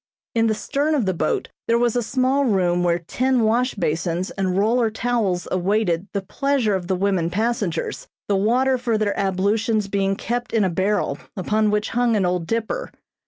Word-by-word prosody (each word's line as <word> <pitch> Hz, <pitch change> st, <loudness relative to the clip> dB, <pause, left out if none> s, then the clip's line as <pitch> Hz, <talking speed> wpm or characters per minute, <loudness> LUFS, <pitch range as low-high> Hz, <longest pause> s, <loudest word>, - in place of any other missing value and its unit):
In 230 Hz, -1 st, +2 dB
the 220 Hz, -, +1 dB
stern 290 Hz, +8 st, 0 dB
of 260 Hz, -8 st, +1 dB
the 190 Hz, -, +1 dB
boat 155 Hz, -2 st, -1 dB, 0.2 s
there 230 Hz, -, +3 dB
was 240 Hz, -1 st, +1 dB
a 245 Hz, -, +2 dB
small 260 Hz, +4 st, +1 dB
room 180 Hz, -7 st, +2 dB
where 170 Hz, -1 st, +2 dB
tin 250 Hz, +9 st, 0 dB
wash 235 Hz, +3 st, +1 dB
basins 170 Hz, 0 st, -1 dB
and 190 Hz, -2 st, -1 dB
roller 225 Hz, +3 st, +2 dB
towels 220 Hz, -6 st, -1 dB
awaited 185 Hz, -1 st, 0 dB
the 200 Hz, -2 st, -2 dB
pleasure 270 Hz, 0 st, 0 dB
of 185 Hz, -2 st, -2 dB
the 190 Hz, -, +1 dB
women 185 Hz, -3 st, 0 dB
passengers, 205 Hz, -4 st, -2 dB, 0.2 s
the 205 Hz, -, +2 dB
water 250 Hz, +6 st, +2 dB
for 235 Hz, -3 st, 0 dB
their 210 Hz, -1 st, 0 dB
ablutions 205 Hz, +3 st, 0 dB
being 195 Hz, -1 st, 0 dB
kept 240 Hz, +4 st, -3 dB
in 225 Hz, -2 st, +3 dB
a 185 Hz, -, +1 dB
barrel, 195 Hz, +5 st, 0 dB, 0.2 s
upon 215 Hz, +3 st, +1 dB
which 210 Hz, +1 st, 0 dB
hung 240 Hz, -1 st, +2 dB
an 200 Hz, -3 st, +2 dB
old 180 Hz, -2 st, -1 dB
dipper. 230 Hz, -, -2 dB
210 Hz, 185 wpm, -22 LUFS, 185-235 Hz, 0.2 s, there